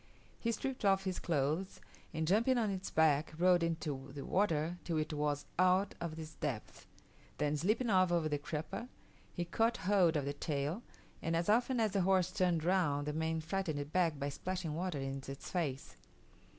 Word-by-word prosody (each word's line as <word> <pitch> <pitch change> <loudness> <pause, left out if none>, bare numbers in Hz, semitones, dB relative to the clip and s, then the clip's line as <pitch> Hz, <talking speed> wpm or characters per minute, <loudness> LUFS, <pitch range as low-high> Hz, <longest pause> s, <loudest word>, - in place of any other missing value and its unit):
He 230 - 0
stripped 255 +3 -3
off 195 -1 +4
his 185 -2 -2
clothes, 160 +4 -1 0.3
and 160 -2 -2
jumping 230 +8 +3
on 220 -4 +1
its 190 0 -4
back, 155 -1 +3
rode 180 0 +5
into 150 -5 -2
the 140 - -5
water 170 -3 +1
till 165 -2 -1
it 155 0 -1
was 145 -1 -1
out 185 +2 +4
of 165 -2 -4
its 160 -1 -7
depth; 135 -9 -5 0.5
then 150 +1 +1
slipping 215 - +1
off 185 -2 +4
over 170 -2 +2
the 145 -1 -1
crupper, 155 - -5 0.4
he 175 - -3
caught 225 +6 +1
hold 185 -5 +4
of 145 - -1
the 140 - -2
tail, 145 +6 -2 0.4
and 165 +1 0
as 170 +3 0
often 245 +3 +3
as 220 -2 +2
the 195 - +1
horse 185 -1 +3
turned 175 -4 +1
round 165 -5 +2
the 150 - -2
man 160 +1 -1
frightened 170 -1 -2
it 145 +1 -5
back 170 -5 +2
by 140 0 -2
splashing 180 +2 -3
water 175 0 -2
in 135 0 -3
its 135 0 -7
face. 150 -7 -2
165 Hz, 190 wpm, -35 LUFS, 150-190 Hz, 0.5 s, rode